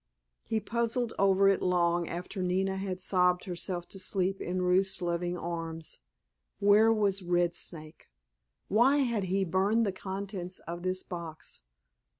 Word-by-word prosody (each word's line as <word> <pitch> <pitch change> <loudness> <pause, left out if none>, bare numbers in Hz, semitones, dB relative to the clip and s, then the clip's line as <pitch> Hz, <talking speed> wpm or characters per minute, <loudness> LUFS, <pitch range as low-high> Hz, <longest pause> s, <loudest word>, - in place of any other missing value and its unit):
He 225 -1 0
puzzled 235 +1 -1
over 195 0 +4
it 195 - +3
long 175 -1 +2
after 180 +2 -5
Nina 190 +1 0
had 190 -1 -3
sobbed 180 -1 +3
herself 175 -1 -4
to 195 - -7
sleep 190 0 0
in 180 +1 -2
Ruth's 185 +2 +2
loving 175 0 -1
arms. 165 -1 -5 0.6
Where 210 +3 +5
was 205 -3 +1
Red 175 -1 +1
Snake? 155 -3 -9 0.6
Why 245 +7 +4
had 230 -6 -1
he 190 +1 0
burned 195 +6 +2
the 200 - 0
contents 190 -1 -6
of 170 +1 -6
this 185 +1 -1
box? 165 - -8
185 Hz, 145 wpm, -30 LUFS, 175-195 Hz, 0.6 s, Where